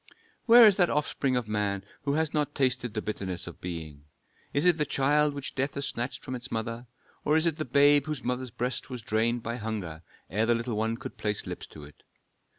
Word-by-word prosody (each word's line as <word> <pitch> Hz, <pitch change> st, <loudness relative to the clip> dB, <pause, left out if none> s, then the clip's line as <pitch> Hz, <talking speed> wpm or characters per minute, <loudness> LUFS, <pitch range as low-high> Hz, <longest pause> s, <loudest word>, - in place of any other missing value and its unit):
"Where 235 Hz, 0 st, +10 dB
is 205 Hz, -3 st, +6 dB
that 180 Hz, -3 st, +4 dB
offspring 140 Hz, -3 st, 0 dB
of 125 Hz, -3 st, -1 dB
man 100 Hz, -2 st, -1 dB, 0.2 s
who 140 Hz, -, +1 dB
has 155 Hz, 0 st, 0 dB
not 150 Hz, -1 st, -1 dB
tasted 125 Hz, -4 st, 0 dB
the 110 Hz, -, -2 dB
bitterness 95 Hz, -4 st, -4 dB
of 90 Hz, -, -10 dB
being? 80 Hz, -5 st, -7 dB, 0.5 s
Is 145 Hz, +4 st, +1 dB
it 175 Hz, -3 st, +4 dB
the -, -, +4 dB
child 145 Hz, +1 st, +2 dB
which 140 Hz, -1 st, -5 dB
death 135 Hz, +1 st, -1 dB
has 140 Hz, -, -2 dB
snatched 120 Hz, +4 st, -4 dB
from 130 Hz, -, -5 dB
its 125 Hz, +1 st, -5 dB
mother, 115 Hz, +2 st, -4 dB, 0.4 s
or 150 Hz, +2 st, +3 dB
is 160 Hz, -, +2 dB
it 165 Hz, -2 st, +1 dB
the 155 Hz, -, -2 dB
babe 145 Hz, +2 st, +4 dB
whose 150 Hz, -3 st, -4 dB
mother's 125 Hz, +1 st, -2 dB
breast 125 Hz, +3 st, -3 dB
was 125 Hz, -3 st, -6 dB
drained 115 Hz, +2 st, 0 dB
by 115 Hz, +1 st, -3 dB
hunger 105 Hz, -8 st, -5 dB, 0.3 s
ere 110 Hz, +7 st, 0 dB
the 120 Hz, -, +4 dB
little 115 Hz, 0 st, -2 dB
one 110 Hz, +2 st, 0 dB
could 130 Hz, +1 st, -8 dB
place 105 Hz, -1 st, -1 dB
lips -, -, -6 dB
to 75 Hz, -, -12 dB
it? 75 Hz, 0 st, -14 dB
125 Hz, 220 wpm, -28 LUFS, 110-145 Hz, 0.5 s, Where